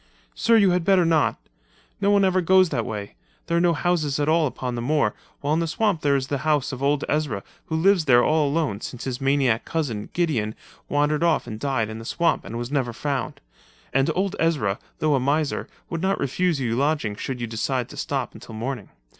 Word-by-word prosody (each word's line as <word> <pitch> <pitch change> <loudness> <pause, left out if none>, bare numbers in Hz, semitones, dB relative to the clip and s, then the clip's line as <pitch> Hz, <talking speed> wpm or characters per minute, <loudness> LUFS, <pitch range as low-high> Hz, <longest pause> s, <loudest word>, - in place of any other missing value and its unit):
"Sir, 230 0 +3
you 200 -4 +5
had 180 -1 +1
better 185 -1 +4
not. 160 -2 +2 0.6
No 200 - +3
one 200 -1 +4
ever 185 0 +2
goes 185 +1 +5
that 120 -7 -2
way. 105 -2 -5 0.3
There 170 - -1
are - - +3
no 175 -1 +4
houses 155 -4 0
at 145 - +1
all 160 0 +3
upon 125 -1 -4
the 120 - -3
moor, 135 -4 +1 0.3
while 145 +1 0
in 160 - +2
the 165 - 0
swamp 195 0 0
there 140 -1 +3
is 135 -1 0
the 140 0 -2
house 150 -2 +1
of 130 -1 -6
old 140 +1 +1
Ezra 145 -10 -1 0.2
who 160 - -2
lives 180 +1 +3
there 120 -3 +6
all 155 -1 +3
alone 140 -9 -1
since 125 - -6
his 130 0 -4
maniac 135 -4 +2
cousin, 125 -11 -3
Gideon, 130 -12 0 0.3
wandered 150 +1 +1
off 170 -1 +2
and 110 - -7
died 130 -5 0
in 110 +1 -7
the - - -8
swamp 170 +7 0
and 115 - -5
was 120 +2 -5
never 130 -5 0
found—and 135 - -3
old 195 +1 0
Ezra 140 -12 +1 0.2
though 155 -1 +1
a 135 - +3
miser 145 +3 0 0.2
would 165 - -2
not 190 +1 +1
refuse 165 +3 0
you 115 -3 -1
lodging 140 -6 0
should 125 +4 -5
you 120 - -2
decide 120 +2 -2
to - - -10
stop 135 -3 -3
until 115 - -11
morning. 120 -1 -4
145 Hz, 215 wpm, -24 LUFS, 120-165 Hz, 0.6 s, there